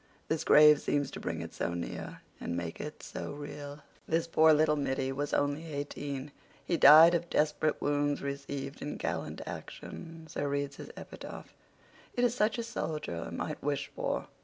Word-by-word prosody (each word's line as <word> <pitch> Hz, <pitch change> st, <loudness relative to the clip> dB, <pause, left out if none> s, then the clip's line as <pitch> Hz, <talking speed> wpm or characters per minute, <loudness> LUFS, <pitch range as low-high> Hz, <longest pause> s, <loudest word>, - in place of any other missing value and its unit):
This 160 Hz, 0 st, 0 dB
grave 150 Hz, -1 st, +7 dB
seems 145 Hz, -1 st, 0 dB
to -, -, -7 dB
bring -, -, -3 dB
it -, -, -9 dB
so 85 Hz, -, -2 dB
near 85 Hz, -, -5 dB, 0.2 s
and 85 Hz, -, -3 dB
make 85 Hz, -1 st, -4 dB
it 150 Hz, -, -7 dB
so -, -, -6 dB
real. 145 Hz, 0 st, -8 dB, 0.2 s
This 165 Hz, +1 st, +1 dB
poor 160 Hz, -1 st, +5 dB
little 150 Hz, 0 st, +4 dB
middy 135 Hz, -2 st, -1 dB
was 145 Hz, +2 st, -2 dB
only 145 Hz, +3 st, 0 dB
eighteen. 145 Hz, -1 st, -4 dB, 0.3 s
He 175 Hz, -, +1 dB
'died 160 Hz, +3 st, +9 dB
of 170 Hz, 0 st, 0 dB
desperate 150 Hz, 0 st, +1 dB
wounds 145 Hz, 0 st, 0 dB
received 140 Hz, 0 st, -5 dB
in 150 Hz, -, -4 dB
gallant -, -, -3 dB
action'—so 165 Hz, -3 st, -7 dB
reads 140 Hz, -1 st, -2 dB
his -, -, -8 dB
epitaph. -, -, -9 dB, 0.6 s
It 245 Hz, -, +1 dB
is 240 Hz, -1 st, +3 dB
such 215 Hz, -2 st, +1 dB
as 230 Hz, -1 st, -3 dB
a -, -, -11 dB
soldier 150 Hz, -, -3 dB
might -, -, -4 dB
wish 145 Hz, -1 st, -2 dB
for." -, -, -2 dB
145 Hz, 170 wpm, -31 LUFS, 140-160 Hz, 0.6 s, died